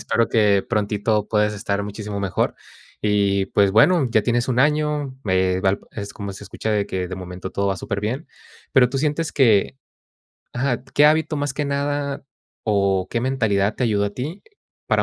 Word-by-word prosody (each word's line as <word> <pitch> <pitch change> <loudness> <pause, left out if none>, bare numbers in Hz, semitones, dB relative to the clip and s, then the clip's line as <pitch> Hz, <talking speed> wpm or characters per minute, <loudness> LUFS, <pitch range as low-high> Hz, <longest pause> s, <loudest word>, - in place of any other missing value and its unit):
espero 115 - +1
que 105 -3 +3
prontito 105 -1 0
puedas 105 -1 +1
estar 100 0 -2
muchísimo 105 0 -5
mejor. 100 -3 -1 0.5
Y, 100 -2 +2
pues, 100 0 +2
bueno, 140 - +5
ya 110 - +3
tienes 120 +3 0
un 125 -1 0
año, 150 -1 +1
me 95 -1 +1
valp 95 0 +1
es 100 -1 -6
como 100 -1 -6
se 100 - -10
escucha 110 +3 -4
de 105 -2 +1
que, 90 -1 -3
de 95 - -5
momento, 90 0 -7
todo 100 - -1
va 95 -1 0
súper 100 +3 -4
bien. 125 +9 -3 0.5
Pero 125 -2 +5
tú 130 - -4
sientes 150 +3 -1
que 115 -2 +3 0.8
ajá, 125 -1 -1
¿qué 145 +2 +4
hábito 155 0 +2
más 145 -1 -2
que 150 - -1
nada 140 0 -2 0.4
o 100 -3 +1
qué 115 - -1
mentalidad 110 -6 +1
te - - -1
ayudó 105 -3 +1
a 100 - -1
ti 145 - -6 0.4
para - - +2
105 Hz, 185 wpm, -22 LUFS, 100-135 Hz, 0.8 s, bueno